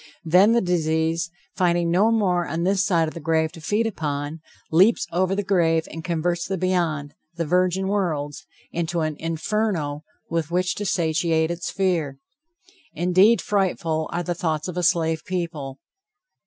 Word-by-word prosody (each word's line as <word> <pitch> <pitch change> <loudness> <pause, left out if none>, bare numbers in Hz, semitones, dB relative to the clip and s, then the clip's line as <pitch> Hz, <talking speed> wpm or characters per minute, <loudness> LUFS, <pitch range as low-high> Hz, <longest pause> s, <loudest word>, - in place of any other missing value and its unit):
Then 185 +7 +5
the 235 - +3
disease, 165 -1 0 0.3
finding 175 -2 +2
no 195 +6 +4
more 185 -6 +1
on 165 +3 -2
this 190 +1 +2
side 170 -5 +2
of 155 - -6
the - - -7
grave 160 0 +1
to 165 - -12
feed 210 +7 0
upon, 150 -6 -3 0.3
leaps 190 +8 +4
over 185 +2 +1
the 205 - -1
grave 165 -4 +2
and 165 0 -7
converts 170 +1 -1
the 190 0 -2
beyond, 165 -5 -1 0.2
the 170 -1 -2
virgin 180 +3 +1
worlds, 160 -8 -2 0.2
into 170 0 -2
an 155 -1 -1
inferno 165 -2 -2 0.2
with 165 -2 -2
which 180 +1 0
to 205 - -2
satiate 160 -1 +1
its 170 -1 -4
fear. 170 -8 -1 0.8
Indeed 185 +5 +4
frightful 170 -6 0
are 175 - -2
the 175 - -2
thoughts 160 -2 -2
of 180 - -5
a 180 - -1
slave 165 -2 +1
people! 165 -7 -4
170 Hz, 160 wpm, -23 LUFS, 160-185 Hz, 0.8 s, Then